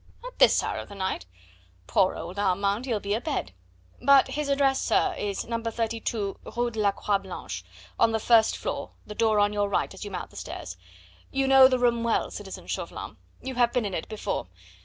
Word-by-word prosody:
"At - - -9
this - - +6
hour - - -2
of - - -8
the 200 - -9
night? 190 - -3 0.6
Poor 185 - +2
old 185 +3 -6
Armand, 200 +4 +1
he'll 225 -4 0
be 200 0 -2
abed. 215 - -2 0.5
But 275 +1 +6
his 300 -1 -2
address, 275 -1 +3
sir, - - +2
is 200 -1 -3
No. 230 0 -2
32, 225 -2 -2 0.2
Rue 240 0 +1
de 220 - -6
la 205 -1 +3
Croix 200 0 0
Blanche, 185 - -7 0.4
on 225 - +5
the 220 - 0
first 225 0 +4
floor, - - -4
the 210 - -7
door 220 -1 +2
on 205 0 +3
your 205 -1 0
right 195 - 0
as 190 - -8
you 205 - -5
mount 190 - -6
the - - -13
stairs; 90 - -6 0.5
you 270 0 0
know 265 -1 +9
the 255 -1 +2
room 240 -1 +2
well, 230 -1 0
citizen - - -8
Chauvelin; - - -5 0.3
you 265 - -4
have 240 -1 +3
been 245 -3 +1
in 200 - -3
it 160 - -4
before. 215 - -3
220 Hz, 205 wpm, -27 LUFS, 200-245 Hz, 0.6 s, know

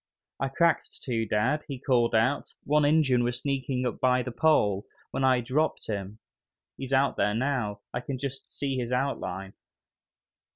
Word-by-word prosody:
"I 135 - 0
cracked 165 +5 +1
two, 115 -3 -1
dad!" 125 +9 +1
he 140 - -5
called 120 -3 +2
out, 120 +6 +1
"one 150 +1 +3
Injun 145 -5 +4
was 120 0 -1
sneaking 130 -2 -1
up 125 - -2
by 125 0 +3
the 125 - -5
pole, 105 -8 +2 0.2
when 135 - -2
I 130 -1 +4
dropped 140 +6 0
him; 100 -1 -4 0.6
he's 135 -1 -7
out 135 +1 +3
there 105 +1 +2
now, 115 -5 -1
I 125 - -1
can 130 +1 -4
just 135 +1 -6
see 135 -2 -2
his 125 -1 -3
outline." 125 -7 -2
130 Hz, 165 wpm, -28 LUFS, 115-140 Hz, 0.6 s, Injun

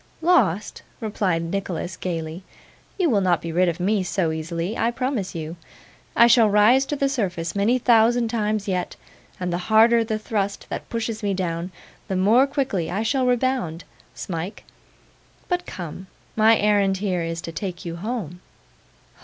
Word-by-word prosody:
'Lost!' 265 - +2 0.2
replied 195 -6 -1
Nicholas 180 0 -3
gaily. 165 -1 -4 0.6
'You 365 -3 +2
will 205 -3 +3
not 180 -3 +2
be 165 - -5
rid 180 +2 +3
of 170 - -4
me 200 +3 +1
so 180 -2 0
easily, 165 +5 -3
I 230 - +1
promise 240 -7 -2
you. 160 +1 -5 0.6
I 235 - +7
shall 235 -2 +6
rise 225 +7 +4
to 295 - -2
the 275 -1 +1
surface 180 - -2
many 210 +5 +2
thousand 235 -1 +4
times 215 -2 -1
yet, 180 -2 -2 0.4
and 180 -1 -2
the 175 - -1
harder 230 +2 +6
the 220 -1 -2
thrust 205 -2 -3
that - - -6
pushes 230 -1 -3
me 200 -2 0
down, 175 -1 -3 0.4
the 190 - -2
more 220 +9 +4
quickly 260 - -1
I 205 +4 -1
shall 255 +2 +1
rebound, 245 -9 0 0.3
Smike. 175 +3 -5 0.8
But 355 -1 -2
come; 180 +1 -7 0.3
my 220 +1 +5
errand 200 -2 +2
here 185 -3 -1
is 165 0 -3
to 165 - -6
take 180 +1 -5
you 170 0 -5
home. 190 -4 -4
200 Hz, 160 wpm, -23 LUFS, 175-230 Hz, 0.8 s, I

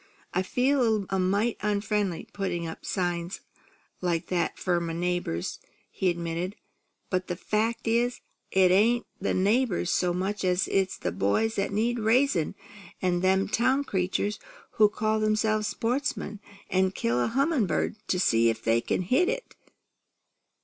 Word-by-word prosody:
"I 185 - +2
feel 255 +8 +1
a - - +3
little 200 -3 0
mite 200 +5 +1
onfriendly, 205 -3 -1
putting 185 -4 -2
up 160 - -7
signs 175 0 -2 0.6
like 170 -2 -1
that 175 -3 0
'fore 175 -2 +1
my 165 -1 -3
neighbours," 175 - -2 0.3
he 190 - 0
admitted, 170 +2 -3 0.6
"but 185 -1 0
the 175 - -2
fact 220 +5 -1
is, 240 +2 +1 0.3
it 185 -1 +4
ain't 230 +6 +3
the 195 - 0
neighbours 200 -2 +2
so 180 -1 +2
much 190 +4 -2
as 180 0 +2
it's 195 -1 +1
boys 100 - 0
that 195 0 0
need 230 +4 0
raising, 225 - +2 0.4
an' 180 -1 +1
them 190 +1 +2
town 260 +6 +2
creatures 195 -1 -1 0.3
who 210 -1 +5
call 215 +1 0
themselves 215 0 +1
sportsmen, 225 -1 -2 0.3
an' 190 0 +3
kill 120 -9 0
a - - +1
hummin' 270 - +1
bird - - 0
to 180 - +1
see 115 -9 +4
if 115 0 -3
they 115 +1 +3
can 180 - -1
hit 260 - +2
it. - - -4
195 Hz, 150 wpm, -27 LUFS, 180-220 Hz, 0.6 s, who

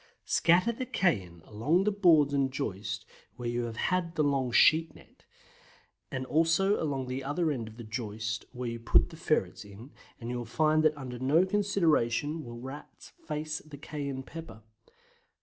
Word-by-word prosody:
Scatter 180 +7 +3
the 250 +2 -5
cayenne 95 - 0
along 145 - +1
the 210 - +2
boards 165 -8 +4
and 135 -1 +1
joist 110 -4 -4 0.3
where 120 -1 -5
you 120 0 -1
have 115 -1 -6
had 180 -2 0
the 155 - +2
long 135 -3 +1
sheet 160 +6 +5
net, - - -19 0.8
and 130 -1 -4
also 165 +8 +2
along 140 -4 -1
the 130 +1 -4
other 150 +4 0
end 120 -6 -3
of 110 +1 -12
the 120 - -8
joist 110 -1 -4
where 125 0 -5
you 115 0 -5
put 115 +8 +3
the - - -10
ferrets 155 - -1
in, 105 +7 -12 0.3
and 115 +1 -5
you 125 - -2
will - - -4
find 155 +6 +2
that 155 -1 +2
under 125 -3 -7
no 150 +8 +3
consideration 165 - +1
will 120 -1 -8
Rats 135 +4 -10 0.2
face 155 0 -3
the 155 -2 -12
cayenne 140 -2 -5
pepper. 160 -7 -10
140 Hz, 175 wpm, -30 LUFS, 120-160 Hz, 0.8 s, sheet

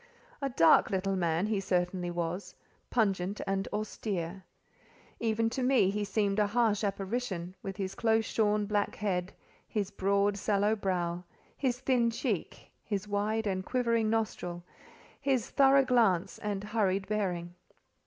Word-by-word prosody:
A 275 - 0
dark 165 -10 +5
little 195 0 0
man 170 0 +1
he 215 -2 0
certainly 180 -1 -1
was; 175 +2 -4 0.3
pungent 200 -3 0
and 195 0 -1
austere. 195 -4 -3 0.8
Even 225 0 +1
to 260 - -2
me 250 -7 +4
he 210 +1 -1
seemed 205 0 0
a 210 - +3
harsh 220 -1 +2
apparition, 195 -2 -2
with 195 -1 -6
his 190 -1 -3
close 225 -1 +2
shorn, 210 -1 +1
black 205 0 0
head, 190 -3 -1 0.4
his 205 -2 -2
broad, 200 +1 +1
sallow 205 +1 +2
brow, 180 -3 -2 0.3
his 250 -3 -1
thin 250 -3 +2
cheek, 225 - -3
his 205 -2 -3
wide 210 +2 0
and 190 -2 -1
quivering 230 -2 +1
nostril, 195 -6 -2 0.6
his 270 -5 0
thorough 275 -1 +5
glance, 225 -9 +2
and 205 -1 -3
hurried 200 -3 0
bearing. 180 -5 -2
205 Hz, 140 wpm, -30 LUFS, 190-225 Hz, 0.8 s, dark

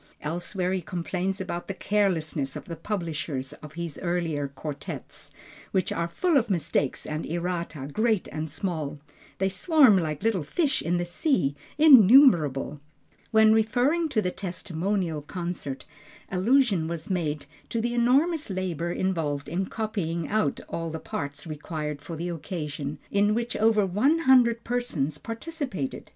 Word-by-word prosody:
Elsewhere 175 +4 -2
he 190 - -1
complains 180 +3 -2
about 180 -2 -4
the 195 - -4
carelessness 170 -9 0
of - - -7
the 170 - -6
publishers 160 -7 -3
of 150 -1 -10
his 170 -2 -5
earlier 170 -5 -1
quartets, 140 +1 -7 0.4
which 190 -2 0
are 170 - -1
"full 330 - +2
of 235 -4 +1
mistakes 150 -6 0
and 155 +1 -3
errata 170 -4 -3
great 220 -3 +1
and 155 0 -4
small. 155 -3 -3 0.4
They 190 - +1
swarm 220 - +5
like 155 -1 -3 0.2
fish 285 - +1
in 175 +2 0
the 175 - -1
sea, 175 - +1 0.2
innumerable." 220 - +6 0.5
When 220 -1 +6
referring 255 +9 +2
to 220 -7 +1
the 180 - 0
testimonial 180 -2 -2
concert, 170 -4 -5 0.5
allusion 195 -3 +3
was 170 +1 -5
made 155 -5 -1 0.2
to 230 - -1
the 240 +1 -1
enormous 275 +6 +2
labor 180 -3 -2
involved 160 -7 -1
in 185 +2 -2
copying 180 -8 -2
out 205 -10 0
all 165 0 -3
the 160 - -4
parts 145 -1 -5
required 150 -1 -5
for 165 +3 -7
the 170 +3 -3
occasion, 150 -4 -4
in 205 +1 +3
which 235 0 -2
over 215 -2 +3
one 215 - +3
hundred 250 -7 +4
persons 170 - -2
participated. 230 - -5
180 Hz, 140 wpm, -26 LUFS, 155-220 Hz, 0.5 s, innumerable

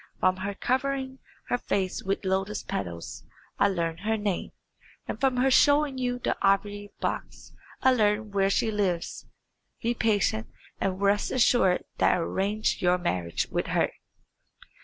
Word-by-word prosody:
From 185 0 +3
her 200 +2 -4
covering 265 +2 -1 0.3
her 245 - +1
face 190 -4 -1
with 195 +1 -2
lotus 195 +2 -1
petals 85 -3 -5 0.4
I - - +5
learn 170 -4 -1
her 220 +2 0
name, 205 -3 -2 0.6
and - - -4
from 265 -2 +2
her 265 +2 +3
showing 285 0 +4
you 245 -1 -1
the 245 - -1
ivory 205 +1 +1
box - - -4 0.3
I 260 - +6
learn 210 -2 +1
where 195 -1 +2
she 220 +2 +1
lives. 190 -5 -2 0.5
Be 235 +1 0
patient, 220 -1 +1 0.3
and 190 -1 -1
rest 200 +1 +2
assured 240 -7 +3 0.2
that - - +4
I - - -1
will 165 - -1
arrange 205 +3 0
your 180 0 +3
marriage 90 - -1
with - - -1
her." - - +1
205 Hz, 155 wpm, -27 LUFS, 190-245 Hz, 0.6 s, I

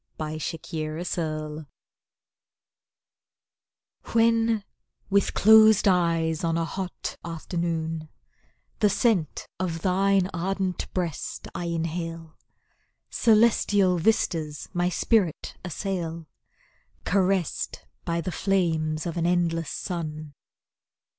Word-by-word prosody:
Exotic 155 +1 -4
Perfume 155 -1 -3 2.5
When, 225 -1 +3 0.5
with 200 0 +2
closed 220 -1 +7
eyes, 165 -3 +2
on 165 0 +1
a 165 - 0
hot 185 +1 -5
afternoon, 165 -1 -3 0.7
The 210 - +4
scent 200 - +1
of 165 -3 -3
thine 195 0 +3
ardent 190 +1 -2
breast 175 -5 -3
I 175 - -4
inhale, 165 -1 -4 0.8
Celestial 210 -5 +4
vistas 160 -6 0
my 175 0 +1
spirit 185 -2 +1
assail; 170 -2 -4 0.8
Caressed 190 -3 0 0.2
by 170 -1 -1
the 180 - -4
flames 160 -4 0
of 170 0 -3
an 170 0 +1
endless 165 -3 +1
sun. 155 -4 -5
170 Hz, 90 wpm, -26 LUFS, 160-195 Hz, 2.5 s, closed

